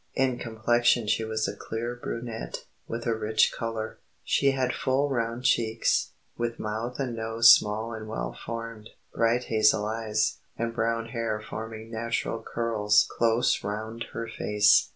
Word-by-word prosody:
In 130 -2 +1
complexion 120 +1 +2
she 105 +2 +1
was 110 0 -1
a 100 - -4
clear 115 +3 -4
brunette, 115 -1 -5 0.2
with 115 0 -4
a 115 - +2
rich 110 0 +2
colour; 115 -1 -4 0.2
she 140 - +3
had 130 -2 0
full 135 +2 +1
round 120 -1 -2
cheeks, 115 -3 +2 0.2
with 120 0 -2
mouth 110 +4 -4
and 125 -4 -2
nose 115 +1 +7
small 110 +2 0
and 110 -1 -7
well 110 - -4
formed, 115 -1 -6 0.2
bright 115 +2 +2
hazel 110 -2 +3
eyes, 110 0 0 0.2
and 115 0 -2
brown 115 0 -1
hair 115 -2 -2
forming 110 +1 -7
natural 115 0 -2
curls 110 -3 +2
close 115 +1 +2
round 110 +3 -4
her 115 0 -4
face. 105 -2 +3
115 Hz, 150 wpm, -27 LUFS, 110-115 Hz, 0.2 s, nose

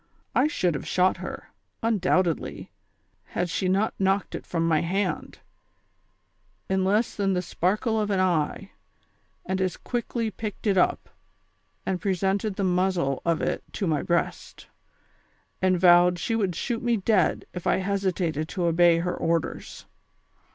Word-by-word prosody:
I 265 - +4
should 180 - 0
have 145 - -5
shot 185 0 +2
her, - - -8 0.3
undoubtedly, 185 -6 0 0.5
had 175 -1 -3
she 185 - -1
not 200 +4 +1
knocked 195 +1 +1
it - - -6
from 165 -1 0
my 160 -2 +3
hand, 190 +3 -2 1.3
in 190 0 +1
less 210 +5 +1
than 195 -2 +1
the 180 - 0
sparkle 215 +6 0
of 210 - -1
an 195 -2 +1
eye, 185 +1 0 0.7
and 190 0 -1
as 185 -1 -1
quickly 235 -2 -3
picked 210 +2 -6
it 200 -2 +3
up, 185 - +2 0.8
and 185 -2 -2
presented 195 +1 0
the 200 - -2
muzzle 180 -6 +1
of 170 -1 +1
it - - -1
to 195 - -2
my 155 -4 +1
breast, 170 0 -2 1.0
and 185 -1 +3
vowed 175 0 +6
she 225 +6 -1
would 195 -6 0
shoot 235 +5 -2
me 235 -1 +1
dead 200 -1 +1
if 180 - -5
I - - +3
hesitated 185 -5 -1
to 180 -3 -2
obey 170 0 +4
her 175 +1 -1
orders. 165 -2 -2
185 Hz, 150 wpm, -26 LUFS, 175-200 Hz, 1.3 s, vowed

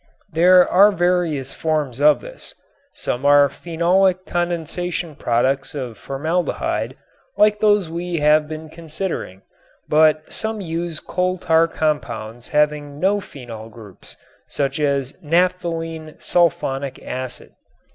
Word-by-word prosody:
There 180 +3 +6
are 200 +3 +6
various 175 -7 0
forms 150 -5 -2
of 150 0 +5
this. - - -11 0.4
Some 120 - -3
are 145 0 +6
phenolic 180 +5 +1
condensation 175 -1 -3
products 130 +5 0
of 125 -5 -5
formaldehyde 155 - -2 0.4
like 210 0 +4
those 205 -4 +3
we 170 +1 -4
have 150 0 +3
been 155 0 -7
considering, 160 - -5 0.4
but 155 0 +4
some 220 0 -2
use 170 -2 -3
coal 185 +1 -1
tar 165 -1 +3
compounds 120 -8 -3
having 150 -1 0
no 200 +3 +2
phenol 115 - -10
groups, 110 -4 -12 0.3
such 140 0 -2
as 140 -3 0
naphthalene 165 -1 -1
sulfonic 140 -6 0
acid. 130 -1 -6
160 Hz, 115 wpm, -20 LUFS, 140-175 Hz, 0.4 s, There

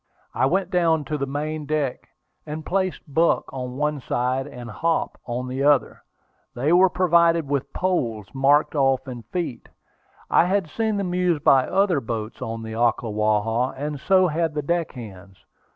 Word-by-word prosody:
I 130 - +2
went 185 +4 0
down 165 -4 +2
to 150 +2 -2
the 140 - -2
main 150 +2 -4
deck, 150 -4 -2 0.4
and 155 +1 -6
placed 185 -1 -1
Buck 160 +4 +2
on 125 -1 -5
one 150 -1 -1
side, 130 +3 -1
and 125 -4 -9
Hop 165 +9 -1
on 125 +1 -3
the 130 +1 -3
other. 140 -3 +2 0.5
They 140 +7 +1
were 185 +1 +6
provided 170 -3 +3
with 140 -1 -2
poles, 120 - -1
marked 140 +3 +3
off 135 -2 +1
in 125 -2 -6
feet. 130 - -5 0.6
I - - +4
had 190 -1 0
seen 220 +5 -1
them 185 -3 -2
used 180 -4 +1
by 135 -1 +5
other 190 -5 +2
boats 110 -1 -5
on 115 0 -4
the 110 0 -6
Ocklawaha, 110 +1 0
and 145 +1 -4
so 185 +5 +4
had 160 -1 -1
the 150 - -2
deck 170 +2 -1
hands. 100 -6 -11
145 Hz, 170 wpm, -23 LUFS, 125-170 Hz, 0.6 s, were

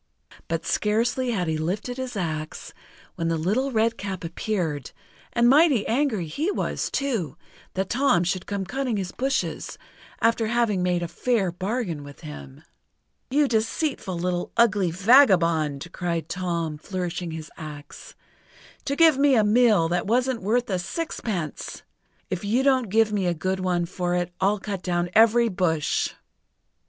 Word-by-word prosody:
But 165 0 -2
scarcely 235 +4 +1
had 190 -7 -1
he 160 -1 -1
lifted 200 +10 -3
his 260 -2 -5
axe, 155 -4 -4 0.4
when 165 - -3
the 165 0 +1
Little 215 +12 0
Redcap 220 -5 -1
appeared, 165 - -2 0.4
and 235 0 +3
mighty 280 -4 +5
angry 235 - 0
he 290 - -2
was, - - -2
too, 215 - -2 0.4
that 190 0 -2
Tom 245 -9 +3
should 180 +1 -2
come 200 -1 -3
cutting 255 +1 -2
his 185 -2 -3
bushes, 270 +1 -2 0.4
after 230 -1 +2
having 225 -5 +1
made 180 -1 +1
a - - -2
fair 210 -1 0
bargain 185 - -3
with 145 -1 -12
him. 70 -3 -10 0.7
"You 290 +2 +3
deceitful, 225 - -1
little, 175 0 -2
ugly 210 -6 +4
vagabond!" 170 - +4
cried 170 -2 -2
Tom, 170 -4 -3
flourishing 180 -1 -4
his 160 -1 -7
axe, 150 -2 -10 0.7
"to 280 - -1
give 320 -3 +5
me 280 -1 +5
a 220 - +4
mill 210 -5 +4
that 175 +2 -1
wasn't 250 +2 +1
worth 235 +5 +1
a 185 - 0
sixpence! 190 - -4 0.5
If 185 0 -2
you 230 +6 +1
don't 260 -5 +2
give 220 +1 +3
me 195 -3 0
a 175 - +1
good 185 +4 -2
one 180 -2 0
for 175 0 -2
it, 175 0 -2
I'll 200 +2 +3
cut 195 -2 -5
down 175 -1 -1
every 230 +2 +5
bush!" 175 -7 0
195 Hz, 150 wpm, -25 LUFS, 175-235 Hz, 0.7 s, mighty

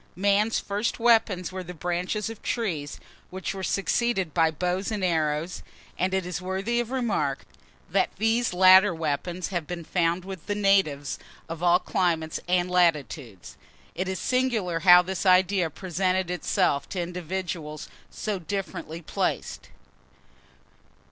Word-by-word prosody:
Man's 205 +3 +2
first 205 +3 -2
weapons 225 -6 +3
were 185 0 -5
the 180 0 -8
branches 180 +6 -2
of 225 -1 -8
trees, 165 -12 -3 0.3
which 190 0 -4
were 195 - -6
succeeded 195 -2 0
by 165 -2 +4
bows 180 +4 -2
and 210 -3 -3
arrows, 160 -1 0 0.3
and 185 +1 0
it 190 -1 0
is 180 0 -4
worthy 190 +6 -1
of 240 -1 -2
remark, 215 - -1 0.4
that - - +1
these 225 +3 +1
latter 185 +1 +6
weapons 165 +3 -3
have 175 -5 -3
been 175 -1 -5
found 170 +1 0
with 190 -4 -8
the 205 - -1
natives 195 -9 +1 0.3
of 165 0 -6
all 175 0 +5
climates 170 -5 -1
and 180 0 +1
latitudes. 150 - 0 0.4
It 185 +2 -3
is 190 0 -2
singular 230 -10 0
how 180 0 +8
this 190 0 -3
idea 185 -2 +4
presented 185 +2 -1
itself 180 -5 0
to 185 - -4
individuals 175 -3 -4 0.2
so 210 -3 -3
differently 175 -3 -5
placed. - - -3
180 Hz, 140 wpm, -26 LUFS, 170-195 Hz, 0.4 s, how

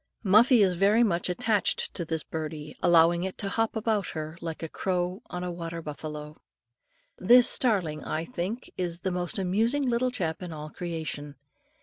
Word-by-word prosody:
Muffie 220 +3 +6
is 185 -2 +3
very 200 +6 +4
much 175 -5 0
attached 205 +3 0
to 170 - -3
this 160 -2 -2
birdie, 155 -1 -6
allowing 170 +1 +5
it 190 0 -4
to 195 - -3
hop 225 +2 0
about 220 -3 0
her, 155 0 -5
like 165 -1 -5
a - - -2
crow 180 +3 -2
on 180 -1 -5
a 180 - -3
water 170 -1 -5
buffalo. 150 0 -7 0.8
This 245 +6 +7
starling, 180 - +1
I 160 +1 -3
think, 215 +4 -5
is 175 -1 -2
the 190 - -1
most 180 +1 -3
amusing 225 +9 +1
little 245 +1 +1
chap 170 -10 -3
in 180 -2 -6
all 155 -1 -7
creation. 160 -4 -5
180 Hz, 170 wpm, -27 LUFS, 160-210 Hz, 0.8 s, This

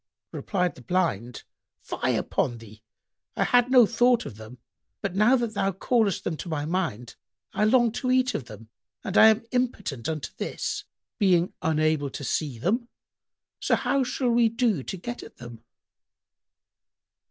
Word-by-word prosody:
Replied 180 -4 -1
the - - -14
Blind, 160 - -1 0.4
"Fie - - -1
upon 120 -2 -1
thee! 110 -1 -14 0.5
I - - +1
had 245 0 +3
no 250 -3 +7
thought 240 +1 +2
of - - -8
them, 110 +3 -11 0.4
but 200 -2 -3
now 215 +6 +5
that 235 -3 -1
thou 195 -1 0
callest 205 +1 0
them 165 - -2
to 175 - -7
my 150 -2 -2
mind, 150 - -3 0.4
I 210 - +2
long 240 +1 +4
to 255 +3 -3
eat 255 0 +2
of 130 - -4
them 110 0 -12 0.3
and 195 - -4
I 220 - +8
am 220 +1 +3
impotent 205 - -2
unto 155 -3 -4
this, - - -4 0.3
being 180 -3 +3
unable 155 -2 +1
to 140 - -7
see 140 -1 -2
them; 235 - -1 0.7
so - - +2
how 275 -1 +1
shall 250 0 -1
we 235 -1 +4
do 230 - 0
to 190 - -6
get 240 +7 -6
at - - -13
them?" 120 -2 -11
190 Hz, 165 wpm, -26 LUFS, 145-235 Hz, 0.7 s, I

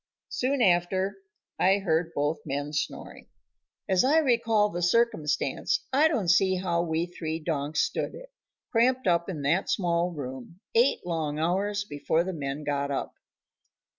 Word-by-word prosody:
Soon 260 0 0
after 190 +2 +1 0.4
I 190 +2 +4
heard 165 -4 0
both 145 +3 0
men 145 0 -4
snoring. 145 - -4 0.6
As 190 -1 +3
I 285 +5 +4
recall 230 -7 +3
the 175 -2 -4
circumstance, 175 - +1
I 295 +4 +5
don't 230 - 0
see 190 +1 +4
how 175 -2 0
we 165 0 -1
three 160 -2 -5
donks 155 -2 -1
stood - - -2
it, - - -12 0.4
cramped 250 +2 +2
up 170 0 +2
in 155 -6 -5
that 165 +7 +1
small 175 -2 +1
room, 135 +1 -8
eight 235 -1 +3
long 160 -4 -2
hours 200 +6 0
before 145 +2 0
the 190 +1 -4
men 145 -1 -4
got 140 -1 -1
up. 140 - -3
175 Hz, 150 wpm, -27 LUFS, 155-205 Hz, 0.6 s, I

